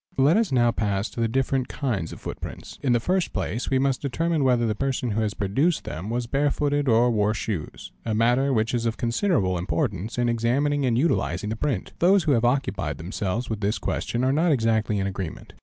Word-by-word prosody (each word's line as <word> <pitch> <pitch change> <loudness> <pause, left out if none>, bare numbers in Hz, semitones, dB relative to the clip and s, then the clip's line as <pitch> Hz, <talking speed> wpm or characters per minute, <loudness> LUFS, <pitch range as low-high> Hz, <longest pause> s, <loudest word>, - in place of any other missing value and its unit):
Let 140 +5 +5
us 220 -5 +2
now 120 -2 +4
pass 100 -2 -1
to - - -8
the 115 - +2
different 130 +1 0
kinds 110 - -2
of - - -9
footprints. - - -8
In 130 - +1
the 120 - +4
first 180 +8 0
place 115 - -2
we 135 - +2
must 135 -1 +1
determine 160 +3 0
whether 125 -3 +3
the 110 - +1
person 130 0 -1
who 110 +2 0
has 105 -1 -1
produced 135 - +1
them 90 +6 -6
was 120 +1 -1
bare 140 +4 +1
footed 145 0 0
or 120 +1 +4
wore 105 -1 +1
shoes, 105 -7 -5
a 110 -2 -1
matter 120 +5 +3
which 115 -1 +1
is 120 -1 0
of 115 - -2
considerable 115 - +1
importance 90 +6 -2
in 120 0 +2
examining 130 +5 +1
and 115 -2 +2
utilising 105 - 0
the - - -1
print. 125 -5 -2
Those 185 +2 +4
who 155 - +1
have 120 -3 +3
occupied 100 - 0
themselves 100 +7 -3
with 110 -2 -4
this 105 +2 0
question 120 +1 -2
are 130 +1 +2
not 165 +3 +2
exactly 110 -5 +1
in 95 - 0
agreement. 95 -3 -5
120 Hz, 215 wpm, -25 LUFS, 105-135 Hz, -, Let